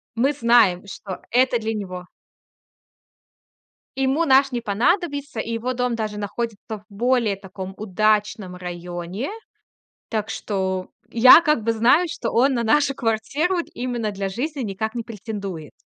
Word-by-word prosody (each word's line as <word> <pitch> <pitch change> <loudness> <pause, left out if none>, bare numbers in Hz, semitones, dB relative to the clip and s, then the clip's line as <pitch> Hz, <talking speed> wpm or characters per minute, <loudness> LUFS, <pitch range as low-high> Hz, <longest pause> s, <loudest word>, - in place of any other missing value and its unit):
мы 265 +5 +2
знаем, 235 -8 +4
что 195 -1 -7
это 250 0 +3
для 225 0 -2
него 185 -4 -5 1.9
Ему 270 +4 +1
наш 270 -1 +5
не 240 -1 -2
понадобится. 285 - 0
И 230 - -3
его 235 +3 -2
дом 250 -1 -1
даже 215 -2 -3
находится 210 +1 -4 0.2
в 210 - -19
более 235 0 +1
таком 190 -1 -8
удачном 210 -1 0
районе. 175 - -5 0.8
Так 215 -2 -2
что 190 -2 -2 0.2
я 255 +7 +8
как 300 -8 +1
бы 230 - +2
знаю, 250 +10 +4
что 270 -6 -3
он 265 +4 +3
на 235 -2 0
нашу 280 +4 +3
квартиру 270 +11 0
д - - -20
именно 240 -3 -2
для 195 -1 -3
жизни 275 +8 -3
никак 220 0 -3
не 235 - -3
претендует. 200 -7 -6
225 Hz, 145 wpm, -22 LUFS, 200-255 Hz, 1.9 s, я